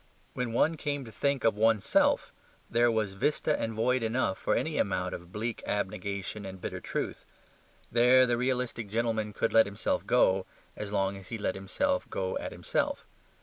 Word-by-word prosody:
When 125 -2 -2
one 155 +7 +2
came 145 -3 -3
to 115 - -10
think 140 +5 0
of 115 - +3
ONE'S 110 -2 +3
SELF, - - +3 0.4
there 120 +1 +4
was 110 -4 0
vista 150 +8 +1
and 115 - -1
void 125 +3 +2
enough 115 -3 0
for - - +1
any - - -1
amount - - 0
of 85 0 -8
bleak 115 +3 -3
abnegation 100 0 -3
and 95 -1 -7
bitter - - -5
truth. - - -4 0.7
There 125 +2 +6
the 120 -1 +1
realistic 125 -3 -1
gentleman 110 -1 0
could - - -1
let 115 -1 +6
himself 100 +2 -2
go 95 -6 +3 0.3
as 105 -1 -5
long 100 -1 0
as 95 -2 -11
he 115 - -3
let 100 -3 -1
himself 275 - -1
go 95 -1 -2
at - - -5
himself. - - -2
115 Hz, 180 wpm, -29 LUFS, 100-125 Hz, 0.7 s, There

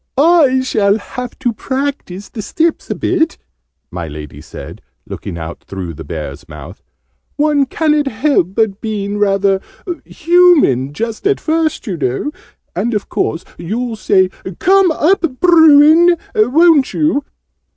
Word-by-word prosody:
"I 290 -4 +4
shall 210 -5 +1
have 250 +2 -8
to 245 -3 -1
practise 260 -6 -4
the 225 - -7
steps 325 +10 -1
a - - -2
bit," 330 -3 0 0.5
my 85 -2 -5
Lady 75 -1 -9
said, - - -10 0.2
looking 85 - -7
out 80 0 -7
through 95 -4 -7
the - - -9
Bear's 75 -2 -7
mouth: 75 -2 -11 0.5
"one 290 -2 +1
ca'n't 300 0 0
help 225 - 0 0.2
being 205 -2 -3
rather 195 -1 +1 0.4
human 325 - +3
just 225 - -4
at 410 - +1
first, 320 -2 -1
you 190 -7 -4
know. 135 - -2 0.4
And 235 -1 -1
of 205 - -3
course 165 - -2
you'll 225 +7 -3
say 190 -3 +2 0.3
'Come 385 0 +4
up, 320 -4 0
Bruin!', 325 0 +6 0.2
won't 285 +6 +3
you?" 300 -2 +1
250 Hz, 130 wpm, -15 LUFS, 195-315 Hz, 0.5 s, Bruin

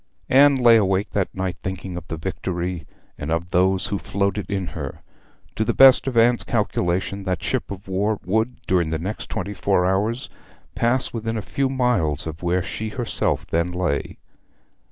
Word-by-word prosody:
Anne 140 +2 +6
lay 120 -3 +6
awake 95 -1 +1
that 100 -3 0
night 95 -1 -2
thinking 95 -1 -5
of 90 -1 -7
the 80 - -4
Victory, 90 0 -4 0.3
and 70 - -4
of 85 +2 -2
those 95 +1 +2
who 100 - -2
floated 100 +1 -2
in 95 -2 -1
her. 75 -5 -7 0.5
To 110 - +2
the - - -1
best 135 0 +7
of 125 -3 -1
Anne's 120 +1 +4
calculation 100 -3 -1
that 90 -3 -2
ship - - -2
of 100 +1 -8
war 100 +3 0
would, 110 +6 0
during 85 -3 +1
the 80 - -1
next 95 +7 -5
twenty 100 -1 -3
four 95 -3 +1
hours, 105 +7 0 0.5
pass 125 +2 +1
within 115 -1 -3
a - - -2
few 135 -1 -1
miles 125 - 0
of 80 0 -6
where 90 +1 +1
she 110 +4 -4
herself 120 +1 -1
then 85 +2 0
lay. 90 -5 -2
95 Hz, 175 wpm, -22 LUFS, 90-110 Hz, 0.5 s, best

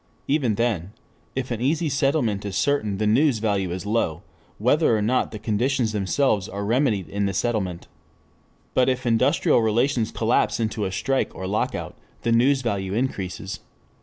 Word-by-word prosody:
Even 135 -7 +1
then, 105 -5 -1 0.4
if 130 -1 -3
an 120 -1 -2
easy 155 +6 +1
settlement 135 -7 +1
is 100 -2 -4
certain 110 -9 +1
the 105 - 0
news 125 +4 +3
value 100 -4 0
is 90 +3 -5
low, 105 -7 -1 0.3
whether 125 +1 +3
or - - -1
not 125 +4 +1
the 110 - -7
conditions 115 +3 0
themselves 105 +1 +1
are 100 +1 -4
remedied 115 - +1
in 100 0 -1
the 95 - -3
settlement. 95 -7 -2 0.9
But 130 0 +3
if 130 0 -1
industrial 115 0 +3
relations 115 +1 +1
collapse 115 +1 +1
into 110 -2 -1
a 95 - -2
strike 125 +8 -1
or 95 - -5
lockout 100 +3 -2 0.3
the 115 - +1
news 130 +4 +3
value 100 -4 -2
increases. 95 -6 -3
110 Hz, 165 wpm, -24 LUFS, 100-130 Hz, 0.9 s, news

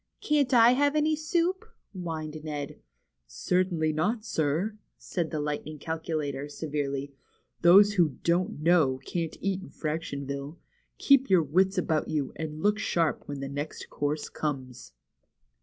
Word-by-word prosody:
Can't 290 -4 +1
I 235 -1 +7
have 285 +3 +2
any 305 +1 +2
soup?" 340 +5 0 0.3
whined 155 -4 -5
Ned. 145 -2 -5 0.5
Certainly 160 - 0
not, 210 +8 -1
sir," 175 +5 -1 0.2
said 170 -4 -3
the 155 - -3
Lightning 150 +1 -3
Calculator, 150 -3 -3
severely. 140 -2 -3 0.5
Those 200 +4 +7
who 175 -5 +4
^ 130 - -16
don't 170 -2 0
know 160 -6 +4
' - - -25
can't 165 -2 -3
eat 195 -1 -1
in 190 - -10
Frac 155 +1 -3
tionville. 140 +1 -5 0.4
Keep 275 -1 +4
your 185 -4 +5
wits 190 +6 +2
about 160 -3 0
you, 145 -4 -2
and 155 0 -5
look 210 +1 +3
sharp 165 -6 0
when 145 -1 -5
the 135 - -3
next 145 +2 -6
course 145 +1 -2
comes." 130 - -5
160 Hz, 150 wpm, -28 LUFS, 145-195 Hz, 0.5 s, I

